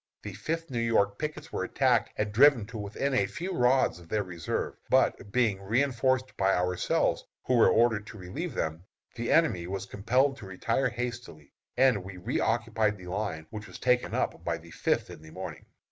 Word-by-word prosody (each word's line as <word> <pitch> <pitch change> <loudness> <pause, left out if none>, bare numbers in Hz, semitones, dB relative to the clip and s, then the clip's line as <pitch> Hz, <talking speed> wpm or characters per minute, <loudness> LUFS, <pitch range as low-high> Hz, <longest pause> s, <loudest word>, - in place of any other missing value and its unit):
the 105 - -6
Fifth 165 - -4
New 120 - -1
York 100 -3 +2
pickets 150 0 -5
were - - -1
attacked - - +2
and 105 0 -1
driven 130 -2 +6
to 115 +3 -12
within 110 +7 -2
a 100 -6 +2
few 175 - -5
rods 125 - +3
of 85 -1 -16
their 105 -1 0
reserve; 90 -4 -3 0.2
but 100 - +2
being 110 -4 +2
reënforced 130 +4 +1
by 95 0 +3
ourselves, 90 0 +1 0.2
who 130 - 0
were 115 - +6
ordered 110 -3 +3
to 105 - -10
relieve 120 - -5
them, 80 +2 -2 0.3
the 120 -1 -3
enemy 95 - +3
was 95 +1 -4
compelled 125 +8 +1
to 100 - -10
retire 115 +7 0
hastily, 120 - -6 0.2
and 125 -8 +4
we 95 0 -9
reoccupied 110 +2 0
the 90 - -12
line 90 -4 -3
which 110 0 -7
was - - -10
taken 125 -1 +1
up - - -1
by 85 -1 -1
the 85 0 -15
Fifth - - 0
in - - -11
the 80 - -13
morning. - - -8
110 Hz, 190 wpm, -29 LUFS, 95-125 Hz, 0.3 s, driven